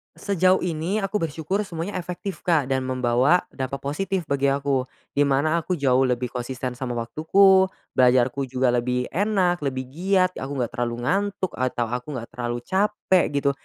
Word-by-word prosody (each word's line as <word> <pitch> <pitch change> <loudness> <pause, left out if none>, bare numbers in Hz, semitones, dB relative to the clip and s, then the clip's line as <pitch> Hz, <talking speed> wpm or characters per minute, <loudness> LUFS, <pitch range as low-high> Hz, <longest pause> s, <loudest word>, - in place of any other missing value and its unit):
Sejauh 185 -1 +2
ini, 170 +3 -1
aku 200 +2 -1
bersyukur 165 +5 -2
semuanya 175 +3 -4
efektif 180 +2 -6
Kak, 150 -7 +2
dan 130 -1 0
membawa 130 +6 +2
dampak 135 +1 -4
positif 185 +5 -2
bagi 140 -1 +1
aku. 135 -2 0 0.3
Di 145 - +2
mana 155 +5 +2
aku 180 - -2
jauh 130 -2 +3
lebih 125 -1 -1
konsisten 125 0 -4
sama 125 -2 -3
waktuku, 190 +11 +4 0.3
belajarku 130 +2 +3
juga 130 -1 +1
lebih 125 +1 0
enak, 190 -3 +1
lebih 130 -2 -2
giat, 185 +3 +2
aku 140 +2 -5
enggak 120 -3 -1
terlalu 120 -1 -2
ngantuk 195 0 0
atau 125 -2 -1
aku 125 +4 -4
enggak 115 - -7
terlalu 120 0 -3
capek, 190 -2 +2
gitu. 140 0 +2
140 Hz, 165 wpm, -24 LUFS, 130-185 Hz, 0.3 s, waktuku